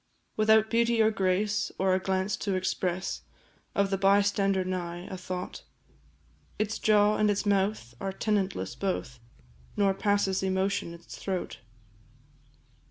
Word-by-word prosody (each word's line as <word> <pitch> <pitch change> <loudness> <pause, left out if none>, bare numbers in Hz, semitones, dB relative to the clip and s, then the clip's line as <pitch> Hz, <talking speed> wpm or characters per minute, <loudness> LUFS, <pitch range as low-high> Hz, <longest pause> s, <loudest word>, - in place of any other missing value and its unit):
Without 220 0 +4
beauty 235 0 +2
or 220 0 +5
grace, 200 +2 0
or 190 0 +2
a 185 - +2
glance 190 +1 0
to 195 0 -2
express 185 -1 -2 0.5
Of 200 0 +2
the 195 - 0
bystander 195 -1 +3
nigh, 175 -1 -4
a - - -4
thought; 185 0 -6 1.0
Its 215 +1 -1
jaw 210 -1 +4
and 210 - +3
its 205 +1 0
mouth 195 - 0
are 195 - -2
tenantless 190 - -1
both, 130 -4 -3 0.6
Nor 200 -1 +3
passes 200 -1 +1
emotion 190 -2 -1
its 170 - -12
throat. 185 -2 -4
195 Hz, 130 wpm, -28 LUFS, 185-205 Hz, 1.0 s, or